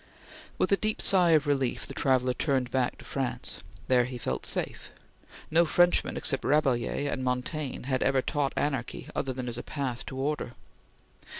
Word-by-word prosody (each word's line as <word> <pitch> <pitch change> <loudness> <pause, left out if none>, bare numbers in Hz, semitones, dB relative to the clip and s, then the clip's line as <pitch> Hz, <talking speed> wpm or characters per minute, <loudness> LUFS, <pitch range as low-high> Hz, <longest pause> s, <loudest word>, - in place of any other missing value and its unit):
With - - +1
a 200 - +5
deep 215 +1 -1
sigh 180 -4 +5
of 155 -1 +4
relief, 135 -4 0
the - - -8
traveller 130 -2 +2
turned 130 -2 0
back 130 -2 0
to - - -14
France. 135 -3 -2 0.3
There 125 -2 +4
he 125 0 -6
felt - - -2
safe. - - -1 0.6
No 165 +2 +5
Frenchman 175 +2 +3
except 135 - +1
Rabelais 135 -2 +1
and 135 -2 -2
Montaigne 130 +2 -2
had 130 -1 0
ever 135 -1 +2
taught 145 -3 0
anarchy 135 -5 -2
other 130 - -1
than 125 -1 -5
as 120 0 -3
path 130 -5 -3
to 130 - -6
order. 140 -2 -2
135 Hz, 170 wpm, -28 LUFS, 125-150 Hz, 0.6 s, a